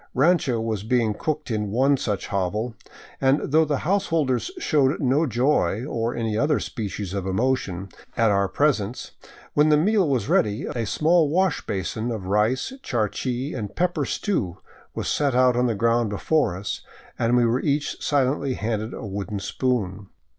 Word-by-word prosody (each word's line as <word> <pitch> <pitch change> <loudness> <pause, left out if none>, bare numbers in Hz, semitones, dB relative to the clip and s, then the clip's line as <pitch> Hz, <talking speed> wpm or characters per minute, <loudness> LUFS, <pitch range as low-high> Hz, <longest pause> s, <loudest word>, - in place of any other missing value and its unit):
Rancho 140 -3 +3
was 110 -3 -2
being 115 0 +1
cooked 150 +4 -3
in 105 -2 -1
one 135 +7 +3
such 105 -7 -2
hovel, 105 +4 -1 0.5
and 135 +1 +2
though 160 +2 +5
the 145 -2 0
householders 165 - +1
showed 150 - +2
no 145 +3 +2
joy, 120 -4 +1
or 115 -4 -2
any 115 -2 -1
other 145 +3 +2
species 100 -3 -5
of 95 -1 -3
emotion, 95 -3 -1 0.3
at 115 -2 +4
our 100 0 +2
presence, 125 -3 0 0.4
when 150 +1 +4
the 150 - +5
meal 195 +1 +3
was 125 -7 0
ready, 105 0 +1
a 115 -3 -3
small 160 - +3
wash 185 +1 +1
basin 110 +4 -2
of 110 -5 -4
rice, 110 - +1
charqui, 125 - -2
and 105 -5 -5
pepper 175 -3 0
stew 105 - -2 0.4
was - - -3
set 140 -4 +1
on 125 -1 +4
the 115 - 0
ground 115 +1 +2
before 105 - +1
us, 100 +1 -4 0.4
and 115 +1 +3
we 120 - +4
were 115 +3 +1
each 145 0 -1
silently 135 -1 +1
handed 110 0 -3
a - - -7
wooden 100 +1 -4
spoon. 100 -3 -2
120 Hz, 160 wpm, -24 LUFS, 105-145 Hz, 0.5 s, though